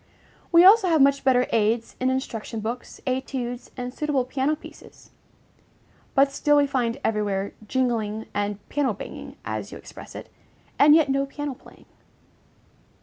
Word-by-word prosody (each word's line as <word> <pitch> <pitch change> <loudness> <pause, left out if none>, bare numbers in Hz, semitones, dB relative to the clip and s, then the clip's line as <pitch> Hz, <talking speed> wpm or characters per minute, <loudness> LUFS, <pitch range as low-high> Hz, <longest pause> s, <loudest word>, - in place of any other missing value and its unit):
We 340 +1 +7
also 400 0 +7
have 320 -2 +3
much 280 0 +4
better 255 -2 +4
aids 225 +1 +1
in 255 - +1
instruction 235 -4 -3
books, 230 +3 -6
études, 255 -1 -3
and 250 0 -5
suitable 290 -4 0
piano 270 +4 0
pieces; 305 - -15 1.0
but 275 0 +4
still 295 +1 +2
we 290 - +5
find 250 -4 -1
everywhere 205 -2 -1
"jingling" 225 -4 -1
and 205 0 -3
"piano 275 -7 0
banging," - - -9
as - - -4
you - - -8
express - - -12
it, - - -9 0.5
and 295 +1 +8
yet 315 -3 +4
no 275 +1 +1
piano 290 0 -5
playing. - - -18
260 Hz, 145 wpm, -24 LUFS, 230-280 Hz, 1.0 s, and